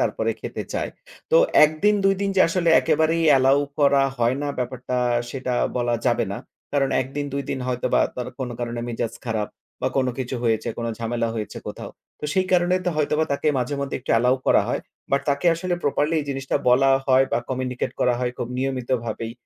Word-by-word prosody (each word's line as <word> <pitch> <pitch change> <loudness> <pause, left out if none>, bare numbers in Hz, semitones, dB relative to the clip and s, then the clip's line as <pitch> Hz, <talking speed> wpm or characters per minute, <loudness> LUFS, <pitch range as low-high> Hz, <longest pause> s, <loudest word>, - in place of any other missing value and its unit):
তারপরে - - 0
খেতে - - -5
চায়। - - -2 0.4
তো 485 - +5 0.3
১ 150 - +3
দিন, 210 - +5
২ 195 0 +5
দিন 200 - 0
যে - - +5
আসলে 170 0 0
একেবারেই 160 +1 +2
অ্যালাও 135 0 +5 0.2
করা 140 -1 +4 0.2
হয় 120 +2 +2
না 145 - -1
ব্যাপারটা 125 0 -3 0.3
সেটা 130 -2 -3 0.2
বলা 120 -1 +1
যাবে - - +2
না। - - -4 0.3
কারণ 140 -2 +2
১ 130 - -2
দিন, 145 - -1
২ 140 0 -2 0.3
হয়তোবা 125 -1 +1 0.2
তার 125 - -4
কোন 130 -2 -3
কারণে 120 0 -3
মেজাজ 115 -1 -3
খারাপ 110 -3 -2 0.3
বা - - +1
কোন 130 -1 +2
কিছু 130 0 -3
হয়েছে, 115 0 +1
কোন 115 - -2
ঝামেলা 115 0 -1
হয়েছে 110 -2 -5
কোথাও। - - -7 0.3
তো - - -6
সেই 185 -1 +1
কারণেই 180 +1 +3
তো - - +3
হয়তোবা 155 +1 +1
তাকে 145 +2 0
মাঝে 125 +3 -1
মধ্যে 140 -1 -2
একটু 125 - -6
অ্যালাও 125 +3 +3
করা - - +5
হয়। - - -1 0.3
বাট 140 0 +3
তাকে 140 +5 +1
আসলে 175 +2 -2
properly 145 +2 +1
এই - - -5
জিনিসটা 135 0 -1
বলা 135 +2 +5 0.2
হয় 130 0 +5
বা - - +3
communicate 130 -1 -3
করা 125 - +3
হয় 125 -1 -1
খুব 120 - -3
নিয়মিতভাবেই 125 -4 -2
130 Hz, 195 wpm, -23 LUFS, 120-145 Hz, 0.4 s, তো